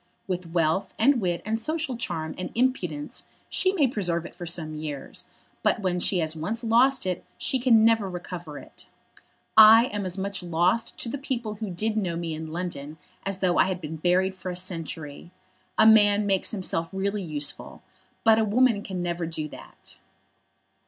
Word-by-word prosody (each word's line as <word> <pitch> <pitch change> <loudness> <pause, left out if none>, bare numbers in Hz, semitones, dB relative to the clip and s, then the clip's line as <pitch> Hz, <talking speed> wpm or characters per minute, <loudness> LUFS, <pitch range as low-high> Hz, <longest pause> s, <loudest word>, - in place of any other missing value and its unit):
With 180 -2 -4
wealth, 170 +3 0
and 245 +2 +3
wit, 175 -2 -1
and 220 +1 -1
social 310 +1 -1
charm, 160 -9 -4
and 185 - -4
impudence, 190 - -1 0.2
she 375 - +4
may 345 -7 +2
preserve 175 -8 0
it - - -9
for 175 - -8
some 160 -2 -1
years, 150 -2 -4 0.3
but 220 - +1
when 180 -2 0
she 185 - +2
has 160 0 -1
once 210 +10 -3
lost 245 +3 +3
it 180 -1 -2
she 265 - 0
can 230 -3 +5
never 225 -4 +3
recover 175 -4 -7
it. - - -13 0.7
I 220 +2 +9
am 205 -1 -2
as 185 0 +1
much 195 0 -2
lost 180 +6 0
to 235 - -1
the 280 - -4
people 240 -5 -3
who 215 0 -6
did 215 +5 -2
know 180 -5 -1
me 165 -1 -3
in 155 0 -6
London 160 -3 -5 0.3
as 195 -1 -1
though 180 -2 +2
I - - +6
had 185 -1 -2
been 160 -1 -6
buried 185 +3 +1
for 185 -1 -7
a 180 - -4
century. 165 -4 -4 0.5
A - - +6
man 210 -1 +6
makes 195 -2 +1
himself 175 -5 -3
really 200 +1 -2
useful, 150 -5 -3 0.4
but 225 -1 +5
a - - +3
woman 225 0 +3
can 185 -3 -5
never 170 -1 -2
do 155 -2 -3
that." - - -14
185 Hz, 185 wpm, -26 LUFS, 170-220 Hz, 0.7 s, I